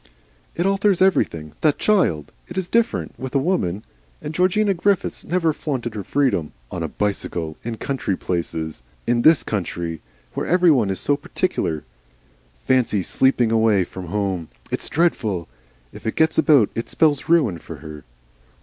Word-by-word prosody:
"It 175 - 0
alters 195 -1 +2
everything. 80 - +2
That 150 -2 +3
child! 175 - +1 0.2
It 175 - -9
is 190 -2 -1
different 230 +3 0
with 130 +1 -6
a - - +6
woman. 135 - 0 0.4
And 150 0 -6
Georgina 190 +4 +2
Griffiths 195 +2 0
never 170 -3 +1
flaunted 130 -7 -3
her 105 -2 -5
freedom 125 - 0 0.2
on 90 - -4
a 80 - -1
bicycle, 85 -4 -3
in 115 -1 -4
country 130 -8 -2
places. 80 -5 -3 0.2
In 120 0 +2
this 155 -3 +5
country. 85 -6 -3 0.3
Where - - -3
every 180 -1 +5
one 120 -9 +3
is 95 -2 -2
so 145 - +2
particular. 140 - -2 0.8
Fancy, 120 -7 +2
SLEEPING 125 +2 +2
away 110 -4 +3
from 90 0 -8
home. 95 -3 -2 0.2
It's - - -2
dreadful 110 - 0 0.5
If - - -8
it 110 - -1
gets 160 0 +3
about 145 -8 +5
it 115 - -4
spells 150 -3 +2
ruin 140 - +3
for - - -9
her." 75 -2 -10
120 Hz, 160 wpm, -22 LUFS, -, 0.8 s, a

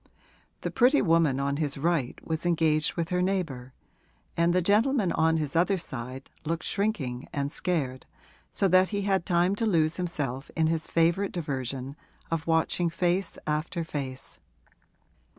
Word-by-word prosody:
The - - -3
pretty 260 +4 +4
woman 165 -6 +3
on 140 0 0
his 145 -3 -1
right 155 -4 0
was 160 0 -2
engaged 160 -3 +2
with 170 -1 -2
her 180 0 +1
neighbour 165 -10 -2 0.6
and 170 +1 +3
the 180 - +3
gentleman 210 +2 +2
on 160 0 +2
his 150 -1 -3
other 180 +4 +3
side 130 -4 -7
looked 165 +1 -2
shrinking 145 - -2
and 140 0 -2
scared, 140 -8 -2 0.4
so 195 - +1
that 185 +1 +5
he 205 -1 -2
had 195 -3 +1
time 180 +1 +3
to 225 - 0
lose 160 -5 +2
himself 145 -7 -3
in 160 - +2
his 160 0 0
favourite 170 +4 +2
diversion 135 -4 -4 0.4
of 165 -1 -2
watching 165 +1 +2
face 175 +2 0
after 155 +3 -1
face. 135 -5 -6
165 Hz, 150 wpm, -27 LUFS, 145-180 Hz, 0.6 s, that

